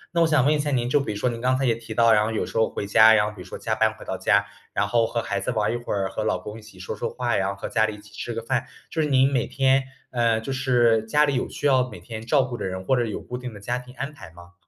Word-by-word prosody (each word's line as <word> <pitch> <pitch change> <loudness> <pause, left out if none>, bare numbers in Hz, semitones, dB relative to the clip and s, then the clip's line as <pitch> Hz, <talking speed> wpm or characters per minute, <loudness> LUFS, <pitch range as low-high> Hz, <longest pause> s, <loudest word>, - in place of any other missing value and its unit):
那 170 - +3
我 165 - +5
想 155 -5 +3
问 150 - +4
一 150 - 0
下 145 0 -1
您， 125 -4 0
就 135 +4 +3
比 140 - -3
如 105 - -4
说 105 - 0
您 115 -1 -3
刚 130 +1 +2
才 135 - 0
也 120 - +3
提 115 0 -10
到， 115 0 +5
然 105 -1 +4
后 110 - -1
有 110 - -1
时 - - -11
候 115 0 +3
回 - - -4
家， 110 +2 +7
然 105 -1 +3
后 105 - -3
比 95 - -10
如 - - -10
说 - - -7
加 110 - -2
班 110 0 +2
回 - - -12
到 - - -3
家， 100 +2 +2 0.3
然 100 - 0
后 115 +1 +2
和 115 - -2
孩 100 - -2
子 100 - -4
玩 110 -4 0
儿 - - -2
一 - - -1
会 120 - -7
儿， 100 -2 0
和 110 - -3
老 105 - +1
公 105 +4 -8
一 - - -14
起 105 -3 -16
说 90 +3 -6
说 - - -3
话 120 -3 -1
呀， 100 0 0
和 100 - -6
家 110 -1 +2
里 110 - -5
一 - - -13
起 105 +1 -17
吃 120 - -5
个 115 0 -4
饭， 125 +2 -1 0.3
就 160 - 0
是 150 - +1
您 135 0 +4
每 125 - +1
天， 135 0 +2 0.3
呃， 115 -2 +2
就 125 +4 -4
是 120 -4 +3
家 150 +7 +3
里 145 - 0
有 125 - -1
需 - - -6
要 130 -3 +3
每 - - -10
天 110 -2 -8
照 135 +4 +3
顾 125 -1 -5
的 - - -5
人， 95 0 -5
或 130 - +3
者 120 -1 +1
有 110 - -5
固 125 - -6
定 125 -3 -7
的 - - -10
家 120 +5 -2
庭 125 0 -14
安 140 +4 -5
排 140 - -12
吗？ 85 +1 -16
115 Hz, 370 characters per minute, -24 LUFS, 105-130 Hz, 0.3 s, 家